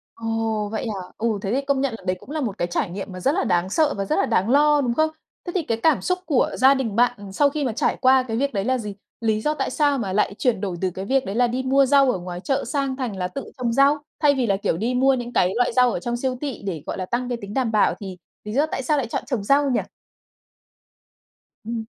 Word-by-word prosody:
Ồ, 225 -2 -2
vậy 220 +2 -3
hả? 195 -4 -5
Ừ, 220 -2 0
thế 195 - -2
thì 270 - +1
công 275 -1 +1
nhận 270 -4 -1
là - - -16
đấy 185 - 0
cũng - - -14
là 310 0 -2
một 220 -8 -3
cái 175 - -1
trải 175 - -1
nghiệm 195 +1 -6
mà 185 - -7
rất 275 - +2
là 390 - 0
đáng 180 -1 +1
sợ 305 +4 +2
và 195 - -2
rất - - 0
là - - +2
đáng 195 +5 +1
lo, 295 +2 +5
đúng 240 -3 0
không? 315 +4 +2 0.4
Thế 350 - -4
thì 365 - +1
cái 230 -5 -2
cảm 320 -3 +4
xúc 365 0 0
của 280 -6 +2
gia 265 +2 +6
đình 230 -6 -2
bạn 230 -5 +1
sau 285 +7 +3
khi 290 0 -2
mà 245 - -1
trải 225 - 0
qua 260 0 +5
cái 225 -3 -4
việc 280 +2 0
đấy 195 -1 0
là 255 +1 +1
gì? 210 -3 -6 0.3
Lý 220 -1 +1
do 300 +6 0
tại - - -2
sao 290 -2 +2
mà 195 -6 -3
lại 200 0 +1
chuyển 235 -6 +1
đổi 190 -3 -3
từ 185 -1 0
cái 190 +2 -6
việc 265 +5 +1
đấy 195 - -4
là 245 +1 +3
đi 250 +2 -2
mua 270 +1 +3
rau 275 -1 +5
ở - - -3
ngoài 175 0 -6
chợ 270 +6 -1
sang 270 +1 -2
thành 245 -7 -3
là 180 -1 -2
tự 275 +9 -6
trồng 240 -2 -1
rau, 275 +4 +4 0.2
thay 290 -2 +4
vì 255 -3 0
là, 195 -2 +2
kiểu, 195 - -1
đi 230 +7 -1
mua 265 +2 +4
những 245 -1 -4
cái 180 -4 +2
loại 245 0 +2
rau 250 0 +4
ở - - -3
trong 240 +5 -2
siêu 255 +1 -2
thị 280 -8 -5
để, 165 -6 -3
gọi - - -4
là, 185 - -3
tăng 245 +3 -2
cái 245 -1 -2
tính 200 +1 -8
đảm 255 -4 0
bảo 215 - +3
thì 190 -3 -7 0.3
lý 210 - -5
do 285 +5 +2
tại 290 - -4
sao 295 +4 +1
lại 265 -4 -1
chọn - - -3
trồng 245 -6 -2
rau 280 +4 +3
nhỉ? 245 - +2 1.8
Ừm. 225 0 -4
240 Hz, 285 wpm, -23 LUFS, 205-275 Hz, 1.8 s, gia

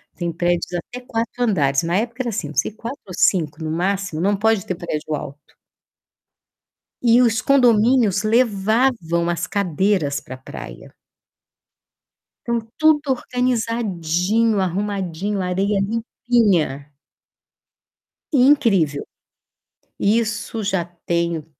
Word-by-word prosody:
tem 175 -1 -3
prédios 175 +1 0
até 245 +8 -6
4 235 -1 -4
andares. 140 - +2
Na 170 +2 0
época, 235 +4 -2
era 245 - -2
assim, 200 -8 -3
não 150 - -10
sei, - - +1
4 230 +5 -8
ou 185 - -8
5 160 -4 +1
no 155 - -3
máximo. 185 0 -1
Não 200 +3 +2
pode 220 -1 +2
ter 185 - -3
prédio 155 -2 -4
alto. 145 0 -8 1.6
E 235 0 +5
os 240 0 +2
condomínios 235 -5 +4
levavam 215 -5 +1
as 175 +1 -1
cadeiras 185 -5 0
pra 130 - -9
praia. 130 - -10 1.6
Então 235 -1 +1 0.2
tudo 305 -3 +3
organizadinho, 225 -5 0
arrumadinho, 195 0 -2
areia 195 +3 0
limpinha. 200 - 0 1.4
Incrível. 230 - +3 0.9
Isso 220 +1 0
já 195 -3 0 0.2
tem, 170 -2 -1
200 Hz, 110 wpm, -21 LUFS, 170-230 Hz, 1.6 s, E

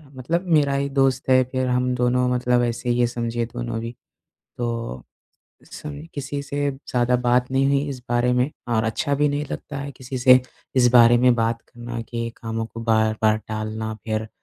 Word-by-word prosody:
मतलब 165 +8 -2
मेरा 145 -3 +4
ही 140 0 -1
दोस्त 135 -1 +1
है, 130 0 +6
फिर 130 -1 0
हम 125 0 +1
दोनों 125 0 +2
मतलब 125 0 +2
ऐसे 120 +1 -2
ही 120 0 +1
है, 120 - +4
समझिए 120 0 -2
दोनों 120 -1 -5
भी। 115 +1 -6 0.6
तो, 115 - -3 0.6
उस - - -21
समय 150 +1 -8
किसी 140 0 -4
से 145 0 -1
ज़्यादा 125 -2 0
बात 125 +1 +1
नहीं 135 +1 +2
हुई 140 0 +2
इस 135 -3 -5
बारे 120 +1 +2
में 125 +3 +1 0.2
और 110 -1 +1
अच्छा 110 +6 0
भी 150 +1 +2
नहीं 145 +1 -1
लगता 140 - -6
है, 140 0 -5
किसी 130 +1 -6
से 130 0 +7 0.4
इस 125 -1 +5
बारे 120 0 +7
में 125 0 +5
बात 115 0 0
करना 120 -1 -7
कि 115 0 -4
कामों 115 0 -4
को 115 +1 -9
बार-बार 110 -1 +2
टालना। 110 0 -4
फिर, 110 0 -2
125 Hz, 190 wpm, -23 LUFS, 115-135 Hz, 0.6 s, से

